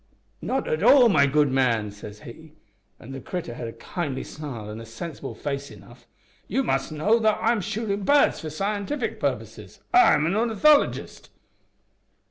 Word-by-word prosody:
`Not 265 +1 -2
at 155 - -1
all, 250 +2 +7
my 140 -8 +4
good 145 0 +2
man,' 115 -6 +1
says 105 +1 -11
he 155 +6 -12 0.5
an' 125 - -11
the 135 0 -7
critter 175 -7 -5
had 120 0 -6
a 115 - -7
kindly 135 +3 -5
smile 135 -9 -8
an' 110 +2 -8
a - - -8
sensible 145 +9 -7
face 140 -1 -4
enough - - -16 0.4
`you 270 - 0
must - - -1
know 205 +10 +2
that 215 -1 +2
I 225 +1 +2
am 230 -3 0
shootin' 210 0 -3
birds 285 +8 +3
for 155 - -6
scientific 200 - -3
purposes. - - -4
I 370 - +6
am 150 0 +1
an 170 +4 0
ornithologist.' 235 +7 +2
160 Hz, 170 wpm, -24 LUFS, 135-220 Hz, 0.5 s, all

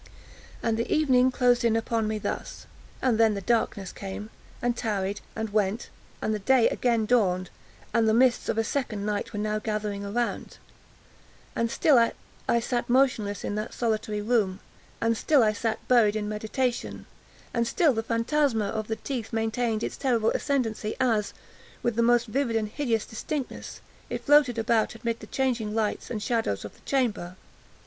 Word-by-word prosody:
And 230 -1 +1
the 230 - -2
evening 260 -4 +4
closed 245 -1 +2
in 230 -1 +3
upon 225 -1 0
me 215 0 -1
thus—and 230 +2 -4
then 220 -2 +4
the 200 - -4
darkness 200 -3 0
came, 205 +2 -7 0.3
and 245 -1 0
tarried, 205 -3 -2
and 220 -1 -3
went—and 210 +1 -2
the 210 - -2
day 245 +3 +4
again 230 -3 +1
dawned—and 210 +1 0
the - - +4
mists 250 0 +3
of - - 0
a 225 - +3
second 225 -5 -2
night 210 -1 -2
were - - -6
now 215 0 -1
gathering 210 -2 -3
around—and 230 +1 -6
still 255 -1 +5 0.5
I 235 - +4
sat 240 +1 -2
motionless 240 -6 +2
in - - -2
that 215 +1 -4
solitary 215 -2 -1
room—and 225 +1 -1
still 280 +3 +4
I 215 -1 +3
sat 220 +1 -3
buried 225 -4 +4
in 210 -1 -2
meditation—and 235 +1 -3
still 325 -3 +3
the 225 - -1
phantasma 230 -1 +1
of 215 0 -3
the 220 - -1
teeth 240 -3 -5
maintained 225 0 0
its - - -3
terrible 235 -5 +2
ascendancy, 225 -6 -1
as, 225 -5 +1 0.5
with 240 -2 0
the 235 - +2
most 240 0 +4
vivid 245 0 -1
hideous 230 -4 -1
distinctness, 270 +4 -5 0.3
it - - -5
floated 290 -5 +5
about 225 0 +1
amid 230 0 -3
the 215 - -10
changing 235 -5 -1
lights 215 -2 -1
and 215 -3 -3
shadows 225 - -1
of 105 - -8
the - - -23
chamber. 210 -10 0
225 Hz, 155 wpm, -27 LUFS, 215-245 Hz, 0.5 s, still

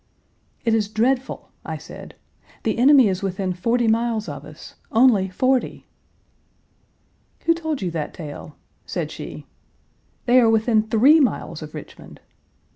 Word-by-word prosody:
"It 230 - +2
is 215 -2 +1
dreadful," 250 +5 -1
I - - -5
said. - - -11 0.5
"The 225 +1 -1
enemy 265 -1 +6
is 185 -1 -1
within 190 -1 -2
forty 230 +6 0
miles 225 -1 0
of 145 -1 -7
us 155 +1 -12 0.2
only 220 -5 +4
forty!" 255 +7 0 1.6
"Who 335 - +3
told 315 - -4
you 180 - -2
that 155 -3 -4
tale?" 150 -2 -9 0.3
said - - -3
she. - - -8 0.8
"They 250 +1 +5
are 230 -2 +4
within 220 0 +3
three 265 +9 +6
miles 200 - -1
of 155 -1 -9
Richmond!" - - -11
225 Hz, 135 wpm, -22 LUFS, 185-250 Hz, 1.6 s, enemy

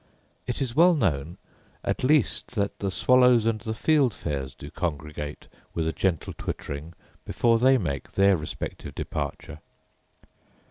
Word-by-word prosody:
It 125 +2 -1
is 120 -2 -5
well 175 +2 +6
known, 80 - -1 0.5
at - - -2
least, 135 -2 +2
that 100 -2 -1
the 100 - -1
swallows 125 +2 +4
and 110 -2 0
the 110 -1 -4
fieldfares 105 - 0
do - - -9
congregate 75 -2 -4 0.3
with 80 -1 0
a 80 - -1
gentle 85 -5 -1
twittering 75 +4 -5 0.3
before 115 -1 +2
they 130 +2 +5
make 70 - -4
their 100 0 +5
respective 75 -3 -6
departure. 75 +1 -5
100 Hz, 135 wpm, -26 LUFS, 75-125 Hz, 0.5 s, well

